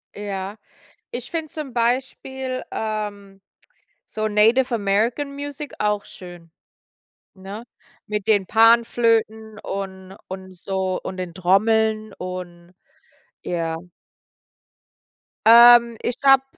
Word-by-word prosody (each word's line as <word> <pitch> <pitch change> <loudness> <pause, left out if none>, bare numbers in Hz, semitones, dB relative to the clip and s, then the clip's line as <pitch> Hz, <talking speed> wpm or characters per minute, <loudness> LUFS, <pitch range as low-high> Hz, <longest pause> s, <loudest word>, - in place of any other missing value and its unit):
Ja. 200 0 -5 0.5
Ich 245 0 -7
finde 320 -3 -4
zum 295 -5 -7
Beispiel, 255 +2 -2
ähm, 205 -3 -5 0.6
so 215 0 -3
Native 225 +5 +3
American 230 +7 0
Music 285 0 -7
auch 210 -1 0
schön, 175 -2 -13 0.8
ne? 200 +4 -9 0.4
Mit 210 -1 -3
den 205 -3 +3
Panflöten 225 -1 +2
und 190 -1 -6
und 190 0 -8
so 190 +1 -2
und 185 - -6
den 180 -2 -5
Trommeln 215 +3 +1
und 180 -1 -8 0.7
ja. 165 -2 -2 1.7
Ähm, 235 0 +8
ich 240 - -3
glaube, 270 -1 +5
215 Hz, 100 wpm, -22 LUFS, 190-235 Hz, 1.7 s, Ähm